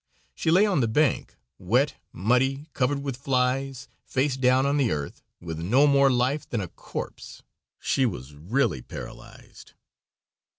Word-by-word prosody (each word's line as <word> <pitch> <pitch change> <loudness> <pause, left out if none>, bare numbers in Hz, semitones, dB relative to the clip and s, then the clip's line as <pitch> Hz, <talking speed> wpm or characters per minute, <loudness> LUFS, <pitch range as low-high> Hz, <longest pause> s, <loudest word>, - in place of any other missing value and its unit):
She - - -2
lay 185 +6 +6
on 195 -7 +1
the 115 - +2
bank, 140 +4 +1 0.2
wet, 125 +10 +2 0.2
muddy, 130 - +1
covered 140 +1 0
with 135 -3 -3
flies, 130 0 -1 0.2
face 135 0 0
down 130 0 +3
on 140 +1 +2
the 135 -5 +2
earth, 75 -2 -4 0.2
with 80 -2 -6
no 120 - +4
more 140 -1 +5
life 130 +4 0
than 115 - -1
a 90 -4 -4
corpse. - - -8 0.4
She 135 -2 +1
was 75 - -6
really 80 - 0
paralyzed. - - -11
130 Hz, 145 wpm, -26 LUFS, 110-140 Hz, 0.4 s, lay